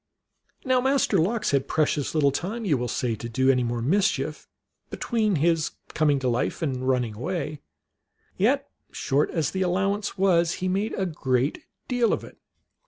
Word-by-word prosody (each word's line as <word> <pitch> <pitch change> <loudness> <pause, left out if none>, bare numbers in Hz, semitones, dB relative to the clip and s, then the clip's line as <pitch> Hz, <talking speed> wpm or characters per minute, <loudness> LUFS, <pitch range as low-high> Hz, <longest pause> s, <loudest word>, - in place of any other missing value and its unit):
Now 255 -1 +3
Master 270 +2 +2
Lox 210 +6 +1
had 140 -1 +1
precious 150 -1 0
little 145 -3 +4
time, 210 - -3
you 160 -7 +3
will 125 -1 -2
say, 120 -1 -1
to 115 +2 -6
do 130 +3 +3
any 125 -1 +2
more 120 -1 -2
mischief 190 - 0 0.4
between 215 -5 0
his 165 +1 +1 0.2
coming 150 -3 +3
to 130 -1 -2
life 125 +6 -1
and 130 -4 -2
running 125 -4 +1
away; 155 - -4 0.8
yet, - - +1 0.2
short 140 +2 0
as 160 -4 -1
the 190 - -2
allowance 195 +3 0
was, 175 -3 +3
he 185 - -3
made 195 +4 -1
a 190 - -1
great 135 -5 -1 0.2
deal 245 -3 +2
of - - -2
it. - - -13
160 Hz, 170 wpm, -25 LUFS, 130-195 Hz, 0.8 s, little